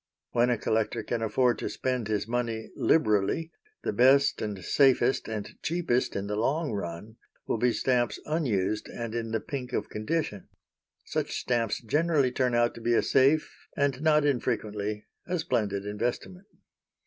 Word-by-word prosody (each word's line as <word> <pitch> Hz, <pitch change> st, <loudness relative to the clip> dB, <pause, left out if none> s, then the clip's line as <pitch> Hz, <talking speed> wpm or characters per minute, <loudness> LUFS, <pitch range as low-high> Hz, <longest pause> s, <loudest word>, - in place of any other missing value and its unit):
When 120 Hz, +1 st, +3 dB
a 120 Hz, -, +2 dB
collector 110 Hz, +1 st, 0 dB
can 115 Hz, +1 st, -2 dB
afford 120 Hz, +2 st, +2 dB
to -, -, -3 dB
spend 125 Hz, -4 st, -2 dB
his 105 Hz, -1 st, -1 dB
money 115 Hz, -2 st, -2 dB
liberally, 155 Hz, +3 st, +2 dB, 0.3 s
the -, -, -1 dB
best 135 Hz, +3 st, +4 dB
and 100 Hz, -5 st, -4 dB
safest, 135 Hz, -1 st, +3 dB
and 110 Hz, -2 st, -4 dB
cheapest 160 Hz, -7 st, 0 dB
in 100 Hz, -, -2 dB
the 105 Hz, +1 st, -2 dB
long 140 Hz, +8 st, 0 dB
run, 100 Hz, +2 st, -5 dB, 0.3 s
will 115 Hz, -, -1 dB
be 125 Hz, +1 st, +3 dB
stamps 125 Hz, 0 st, +1 dB
unused 110 Hz, -, 0 dB
and 115 Hz, -2 st, -5 dB
in 115 Hz, -1 st, -3 dB
the 110 Hz, 0 st, 0 dB
pink 130 Hz, -1 st, -6 dB
of 105 Hz, -, -2 dB
condition. 110 Hz, -, -2 dB, 0.6 s
Such -, -, -2 dB
stamps 115 Hz, -2 st, -1 dB
generally 145 Hz, +2 st, +2 dB
turn 125 Hz, -1 st, +1 dB
out 120 Hz, 0 st, +3 dB
to 115 Hz, -, -11 dB
be 120 Hz, +1 st, +2 dB
a -, -, +3 dB
safe 140 Hz, +4 st, +2 dB
and 140 Hz, -2 st, +1 dB
not 150 Hz, -1 st, +4 dB
unfrequently 105 Hz, -6 st, -1 dB, 0.2 s
a 180 Hz, 0 st, 0 dB
splendid 100 Hz, -, -1 dB
investment. 120 Hz, -, -4 dB
120 Hz, 160 wpm, -28 LUFS, 110-140 Hz, 0.6 s, best